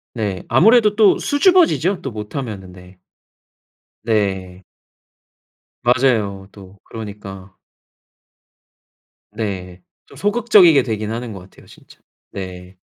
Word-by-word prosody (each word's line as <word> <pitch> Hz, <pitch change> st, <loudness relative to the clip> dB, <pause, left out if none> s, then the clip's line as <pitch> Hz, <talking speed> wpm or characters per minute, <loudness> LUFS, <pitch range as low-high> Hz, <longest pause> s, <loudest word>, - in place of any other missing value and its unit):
네. 100 Hz, -5 st, -3 dB
아무래도 210 Hz, -, +4 dB
또 215 Hz, -2 st, +4 dB
수줍어지죠 290 Hz, -, +2 dB
또 135 Hz, -, -5 dB
못하면은. 105 Hz, -3 st, -7 dB
네. 90 Hz, 0 st, -16 dB, 1.1 s
네. 95 Hz, -4 st, -2 dB, 1.2 s
맞아요 115 Hz, -6 st, +1 dB
또. 100 Hz, -1 st, -15 dB
그러니까. 100 Hz, -3 st, -10 dB, 1.8 s
네. 95 Hz, -4 st, -5 dB, 0.2 s
좀 -, -, -18 dB
소극적이게 205 Hz, -7 st, +4 dB
되긴 110 Hz, -2 st, -4 dB
하는 115 Hz, 0 st, -5 dB
것 95 Hz, -, -9 dB
같아요 95 Hz, +1 st, -18 dB
진짜. -, -, -19 dB, 0.3 s
네. 90 Hz, -1 st, -9 dB
105 Hz, 205 characters per minute, -19 LUFS, 95-140 Hz, 1.8 s, 아무래도